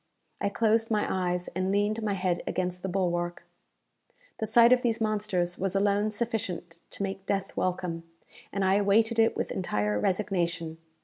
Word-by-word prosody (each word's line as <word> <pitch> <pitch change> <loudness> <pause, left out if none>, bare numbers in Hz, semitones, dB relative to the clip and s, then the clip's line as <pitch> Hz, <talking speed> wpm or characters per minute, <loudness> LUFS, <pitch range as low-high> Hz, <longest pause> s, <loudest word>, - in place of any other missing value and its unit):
I - - +1
closed 225 +2 +2
my 210 -2 +1
eyes, 180 -1 -1
and 185 +2 -1
leaned 205 +2 +1
my 210 -2 0
head 180 -2 0
against 180 0 -2
the 190 - -3
bulwark. 175 -2 -1 1.0
The 220 - -1
sight 235 +2 +7
of 250 - +3
these 230 -2 0
monsters 205 -5 0
was 195 0 -1
alone 205 +1 +2
sufficient 205 -6 -3
to - - -4
make 195 0 -5
death 195 -1 -2
welcome, 180 -2 -1 0.5
and 200 -1 0
I 190 +1 +4
awaited 220 +3 +3
it 225 - +3
with - - -2
entire 105 - -1
resignation. 175 - -1
195 Hz, 165 wpm, -28 LUFS, 180-215 Hz, 1.0 s, sight